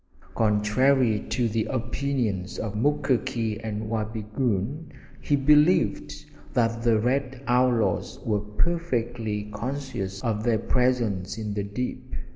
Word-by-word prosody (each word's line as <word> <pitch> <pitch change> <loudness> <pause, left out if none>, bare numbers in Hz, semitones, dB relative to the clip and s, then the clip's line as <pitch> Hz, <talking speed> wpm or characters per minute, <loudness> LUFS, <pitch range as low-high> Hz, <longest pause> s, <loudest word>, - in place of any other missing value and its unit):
Contrary 110 +2 +3
to 120 -2 +1
the 110 0 0
opinions 120 -6 -2
of 105 -2 -3
Mukoki 115 -3 0
and 110 -1 -3
Wabigoon, 110 - -2 0.3
he 145 - +2
believed 145 - +3 0.3
that 115 -1 +2
the 115 -2 +3
red 130 +3 -1
outlaws 120 -6 +2
were 105 -2 +1
perfectly 115 -4 -2
conscious 115 -4 -4
of 110 -2 -1
their 115 -1 +3
presence 115 -7 0
in 105 -2 -3
the 100 - -1
dip. 105 +5 -3
115 Hz, 110 wpm, -26 LUFS, 105-130 Hz, 0.3 s, Contrary